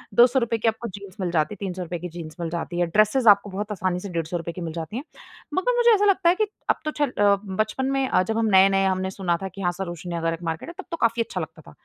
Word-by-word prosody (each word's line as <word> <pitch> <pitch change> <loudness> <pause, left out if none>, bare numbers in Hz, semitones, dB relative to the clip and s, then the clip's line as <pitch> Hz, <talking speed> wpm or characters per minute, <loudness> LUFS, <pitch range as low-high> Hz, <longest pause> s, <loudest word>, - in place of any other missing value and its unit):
₹200 240 -1 +4
की 225 - -1
आपको 225 +1 0
जीन्स 200 -2 -10
मिल 180 -2 -1
जाती 160 +3 +1
है, - - -21
₹300 180 -3 -4
की 180 +2 -6
जीन्स 165 -2 -8
मिल 170 -1 -2
जाती 175 +1 -4
है। 175 - +3
ड्रेसेज़ 215 +7 +3
आपको 200 0 +5
बहुत 205 +2 -4
आसानी 185 -2 -1
से 200 - -7
₹150 170 0 -3
की 180 - -8
मिल 165 -2 -4
जाती 165 +6 -5
हैं। 265 - -4 0.5
मगर 480 +9 +1
मुझे 480 0 +5
ऐसा 415 -1 +3
लगता 385 -3 +4
है 350 - +4
कि 430 +2 +1 0.2
अब - - +5
तो 305 - 0
चल 290 -2 0
अ, 205 -3 +4
बचपन 215 +7 -1
में 270 -1 +1
अ, 185 - +3
जब 220 +4 -2
हम 225 - +2
नए-नए 195 0 +5
हमने 190 0 0
सुना 180 -3 -1
था 195 - -3
कि 195 - -7
हाँ 175 -2 +1
सरोजिनी 175 -2 -5
नगर 165 0 0
एक 165 +1 -8
मार्केट 165 - -4
है, - - -8
तब - - -6
तो 335 - -2
काफ़ी 230 -4 +2
अच्छा - - -5
लगता - - -8
था, - - -11
195 Hz, 280 wpm, -24 LUFS, 175-230 Hz, 0.5 s, आपको